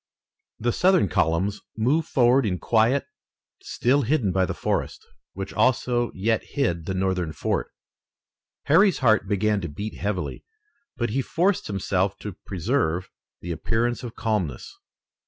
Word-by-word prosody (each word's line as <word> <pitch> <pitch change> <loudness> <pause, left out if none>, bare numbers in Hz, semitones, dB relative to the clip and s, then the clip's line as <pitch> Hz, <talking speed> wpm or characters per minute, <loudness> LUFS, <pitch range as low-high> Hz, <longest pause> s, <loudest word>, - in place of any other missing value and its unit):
The 120 +2 0
Southern 180 - +3
columns 85 +6 0 0.2
moved 140 +8 +1
forward 125 +1 +4
in 95 -5 -1
quiet, 115 - +2 0.6
still 135 +4 +1
hidden 125 -6 +1
by 95 0 +1
the - - -3
forest, - - -2 0.3
which 95 +1 -6
also 120 -2 +1
yet 110 +4 0
hid 85 - -2
the 95 - -2
Northern 95 -3 0
fort. - - -2 0.9
Harry's 185 +6 +4
heart 110 -6 +3
began 105 0 +1
to 85 - -4
beat 100 +9 -5
heavily, 100 -3 -3 0.5
but 120 -3 -1
he 135 +4 +1
forced 180 +8 0
himself 95 -1 -1
to 105 -4 -7
preserve 95 - -1 0.3
the 85 - -5
appearance 115 +8 -1
of 120 -2 -7
calmness. 105 - -2
110 Hz, 140 wpm, -24 LUFS, 95-125 Hz, 0.9 s, forward